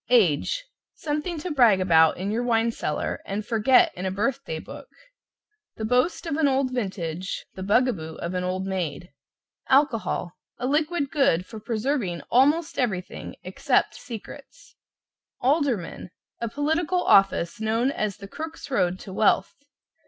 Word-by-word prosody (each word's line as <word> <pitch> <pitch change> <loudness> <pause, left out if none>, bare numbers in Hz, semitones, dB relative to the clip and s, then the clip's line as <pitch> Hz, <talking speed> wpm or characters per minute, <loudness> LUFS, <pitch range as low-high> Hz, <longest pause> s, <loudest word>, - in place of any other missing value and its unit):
=AGE= 240 - +3 0.3
Something 305 +3 -3
to 360 - -4
brag 240 -9 +5
about 160 -4 +4
in 190 +3 -3
your 225 +3 0
wine 230 -1 +2
cellar 150 -8 -3
and 205 +2 -4
forget 230 +4 +4
in 180 - -7
a - - 0
birth 235 +8 -1
day 160 - -4
book - - -10 0.9
The 220 - -4
boast 250 +11 +1
of 315 -3 -2
an 315 -2 +3
old 265 -1 +1
vintage, 185 -6 -3
the 190 - -8
bug 210 +7 +3
a 250 - +1
boo 160 -4 -7
of 170 +2 -5
an 180 0 -1
old 185 +1 -2
maid. 175 -3 -3 0.6
=ALCOHOL= 265 - +2 0.3
A 245 - -4
liquid 300 +1 0
good 225 - +2
for 220 - -9
preserving 220 -4 -2
almost 290 +6 +3
everything 195 -8 -3
except - - +1
secrets. 230 -5 -11 0.7
=ALDERMAN= 255 - 0 0.3
A 235 - -2
political 320 +7 0
office 195 +1 +3
known 225 +4 +1
as 210 -7 -2
the 200 - -9
Crook's 320 +5 -8
Road 180 -8 +1
to 190 - -9
Wealth. 210 - +2
225 Hz, 150 wpm, -25 LUFS, 185-275 Hz, 0.9 s, brag